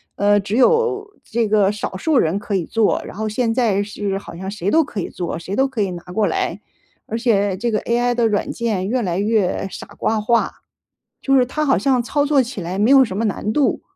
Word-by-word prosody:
呃， 205 Hz, +1 st, +3 dB
只 205 Hz, +3 st, -2 dB
有 425 Hz, -, +2 dB
这 230 Hz, 0 st, -1 dB
个 205 Hz, -2 st, +3 dB
少 205 Hz, -2 st, -5 dB
数 300 Hz, +5 st, +2 dB
人 165 Hz, +1 st, +1 dB
可 210 Hz, 0 st, -5 dB
以 190 Hz, -3 st, +1 dB
做， 225 Hz, +3 st, +1 dB
然 -, -, -10 dB
后 220 Hz, 0 st, -2 dB
现 225 Hz, +2 st, 0 dB
在 225 Hz, -5 st, +1 dB
是 205 Hz, -1 st, -3 dB
好 195 Hz, -, -11 dB
像 190 Hz, +3 st, -5 dB
谁 200 Hz, -2 st, -2 dB
都 320 Hz, +8 st, +4 dB
可 250 Hz, -8 st, -6 dB
以 -, -, -3 dB
做， 175 Hz, -2 st, -4 dB
谁 185 Hz, +4 st, -5 dB
都 270 Hz, +4 st, +3 dB
可 260 Hz, -5 st, -3 dB
以 195 Hz, -, 0 dB
拿 175 Hz, -1 st, -7 dB
过 195 Hz, +3 st, -1 dB
来。 175 Hz, +3 st, -2 dB, 0.5 s
而 225 Hz, -, -3 dB
且 205 Hz, -5 st, +1 dB
这 235 Hz, +4 st, -1 dB
个 215 Hz, -, +1 dB
AI 240 Hz, +1 st, +1 dB
的 235 Hz, -1 st, +2 dB
软 210 Hz, -2 st, -1 dB
件 210 Hz, -5 st, -2 dB
越 250 Hz, +3 st, 0 dB
来 180 Hz, -5 st, -1 dB
越 205 Hz, -2 st, 0 dB
傻 -, -, -8 dB
瓜 220 Hz, -1 st, 0 dB
化， 230 Hz, +2 st, +1 dB, 0.7 s
就 270 Hz, 0 st, +2 dB
是 255 Hz, -, +5 dB
它 305 Hz, +5 st, -2 dB
好 270 Hz, -, +4 dB
像 260 Hz, -3 st, +2 dB
操 285 Hz, +5 st, 0 dB
作 290 Hz, -2 st, +3 dB
起 240 Hz, -6 st, -6 dB
来 180 Hz, +3 st, -4 dB
没 215 Hz, +5 st, +3 dB
有 270 Hz, -1 st, +7 dB
什 215 Hz, -, -5 dB
么 220 Hz, +3 st, 0 dB
难 210 Hz, +1 st, -2 dB
度， 285 Hz, +2 st, +1 dB
215 Hz, 260 characters per minute, -20 LUFS, 200-250 Hz, 0.7 s, 有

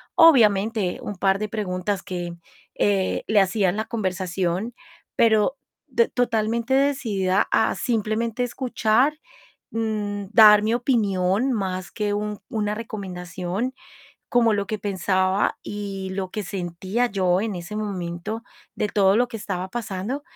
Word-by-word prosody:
obviamente, 220 Hz, -, +5 dB
un 205 Hz, -, -5 dB
par 195 Hz, +1 st, +2 dB
de 215 Hz, 0 st, -3 dB
preguntas 195 Hz, -2 st, -2 dB
que, 175 Hz, -3 st, -5 dB, 0.4 s
eh, 195 Hz, -2 st, +1 dB
le 210 Hz, -2 st, +5 dB
hacía 195 Hz, 0 st, +2 dB
en 185 Hz, -, -2 dB
la 220 Hz, -, -1 dB
conversación, 185 Hz, 0 st, -2 dB, 0.4 s
pero 220 Hz, +3 st, +3 dB, 0.3 s
d 470 Hz, -, +2 dB
totalmente 235 Hz, 0 st, 0 dB
decidida 215 Hz, -9 st, +1 dB
a 220 Hz, -, +3 dB
simplemente 225 Hz, +1 st, -1 dB
escuchar, 245 Hz, +2 st, +1 dB, 0.5 s
mm, 210 Hz, -2 st, -2 dB
dar 210 Hz, -2 st, +8 dB
mi 220 Hz, +2 st, +1 dB
opinión, 220 Hz, -1 st, +1 dB
más 185 Hz, -4 st, -3 dB
que 210 Hz, -2 st, -1 dB
un 210 Hz, 0 st, -3 dB
una 210 Hz, -1 st, -1 dB
recomendación, 190 Hz, 0 st, -4 dB, 0.6 s
como 230 Hz, -2 st, +4 dB
lo 200 Hz, -1 st, -1 dB
que 215 Hz, +2 st, -3 dB
pensaba, 190 Hz, -1 st, 0 dB
y 200 Hz, -2 st, -5 dB
lo 190 Hz, -1 st, -3 dB
que 210 Hz, -, -4 dB
sentía 185 Hz, +5 st, -2 dB
yo 185 Hz, -4 st, +1 dB
en 220 Hz, -2 st, -2 dB
ese 175 Hz, +5 st, -6 dB
momento, 200 Hz, +1 st, -4 dB, 0.3 s
de -, -, 0 dB
todo 195 Hz, -1 st, +3 dB
lo 245 Hz, +1 st, +2 dB
que 235 Hz, -, -6 dB
estaba 185 Hz, -3 st, -4 dB
pasando. 230 Hz, +4 st, -4 dB
205 Hz, 135 wpm, -23 LUFS, 190-225 Hz, 0.6 s, dar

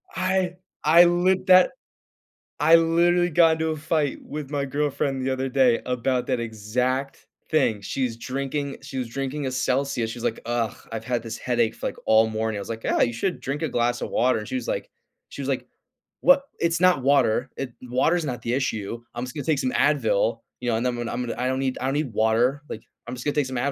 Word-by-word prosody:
I 185 Hz, -1 st, 0 dB, 0.3 s
I 170 Hz, +3 st, +7 dB
lit 185 Hz, +2 st, +2 dB
that 185 Hz, -1 st, +7 dB, 0.9 s
I 160 Hz, +2 st, +6 dB
literally 170 Hz, +2 st, +3 dB
got 165 Hz, 0 st, +5 dB
into 160 Hz, 0 st, -1 dB
a 155 Hz, -, -2 dB
fight 150 Hz, -1 st, 0 dB
with 150 Hz, -2 st, -7 dB
my 140 Hz, -2 st, -1 dB
girlfriend 140 Hz, -1 st, -1 dB
the 135 Hz, -, 0 dB
other 130 Hz, 0 st, -2 dB
day 125 Hz, -3 st, +3 dB
about 125 Hz, 0 st, -1 dB
that 130 Hz, -2 st, 0 dB
exact 125 Hz, +5 st, -2 dB, 0.2 s
thing. 110 Hz, -10 st, +2 dB
She's 120 Hz, +2 st, -2 dB
drinking 140 Hz, +3 st, -3 dB
she 140 Hz, -1 st, -8 dB
was 125 Hz, -2 st, -2 dB
drinking 135 Hz, +4 st, -4 dB
a -, -, -2 dB
Celsius. 130 Hz, -2 st, 0 dB
She's 120 Hz, +1 st, -7 dB
like, 115 Hz, -, -1 dB
"Ugh, 120 Hz, -2 st, -1 dB, 0.2 s
I've 115 Hz, -1 st, -4 dB
had 120 Hz, -2 st, -1 dB
this 115 Hz, 0 st, -6 dB
headache 120 Hz, -2 st, 0 dB
f -, -, -18 dB
like, -, -, -2 dB
all 110 Hz, 0 st, +5 dB
morning." 110 Hz, 0 st, -2 dB
I -, -, -4 dB
was -, -, -9 dB
like, 115 Hz, -1 st, -5 dB
"Yeah. -, -, +1 dB
You 120 Hz, -, +2 dB
should 180 Hz, +10 st, -2 dB
drink 140 Hz, +2 st, -4 dB
a 160 Hz, -, -1 dB
glass 120 Hz, 0 st, 0 dB
of -, -, -3 dB
water." 125 Hz, -1 st, +2 dB
And 105 Hz, -, -7 dB
she -, -, -4 dB
was 255 Hz, -, -3 dB
like -, -, -3 dB, 0.4 s
she -, -, -7 dB
was -, -, -3 dB
like, -, -, -2 dB, 0.5 s
"Wha? 275 Hz, +1 st, +7 dB, 0.2 s
It's 170 Hz, 0 st, +1 dB
not 180 Hz, -6 st, +4 dB
water. 130 Hz, -2 st, +3 dB
It 130 Hz, -3 st, -5 dB
water 130 Hz, +7 st, +1 dB
is 170 Hz, -, -1 dB
not 125 Hz, -4 st, -4 dB
the 120 Hz, -, -2 dB
issue. 115 Hz, -4 st, -2 dB
I'm 120 Hz, -, -3 dB
just 125 Hz, -, -9 dB
gonna 145 Hz, -3 st, -4 dB
take 155 Hz, -4 st, +1 dB
some 130 Hz, -1 st, 0 dB
Advil." 120 Hz, -7 st, +2 dB, 0.2 s
You 125 Hz, -, -2 dB
know? 115 Hz, -, +2 dB
And 115 Hz, -, -2 dB
then 125 Hz, -1 st, 0 dB
"I'm 125 Hz, -, -2 dB
I'm 120 Hz, -, -3 dB
I 125 Hz, -, -1 dB
don't 130 Hz, +1 st, 0 dB
need 130 Hz, -1 st, -1 dB
I -, -, -1 dB
don't 135 Hz, -, 0 dB
need 145 Hz, -6 st, -2 dB
water. 115 Hz, +6 st, +2 dB
Like, 110 Hz, -, -7 dB, 0.2 s
I'm 125 Hz, -, -5 dB
just 120 Hz, -, -8 dB
gonna 145 Hz, -, 0 dB
take 145 Hz, -3 st, +2 dB
some 130 Hz, -, -6 dB
Advil." 140 Hz, +4 st, 0 dB
130 Hz, 235 wpm, -24 LUFS, 120-150 Hz, 0.9 s, I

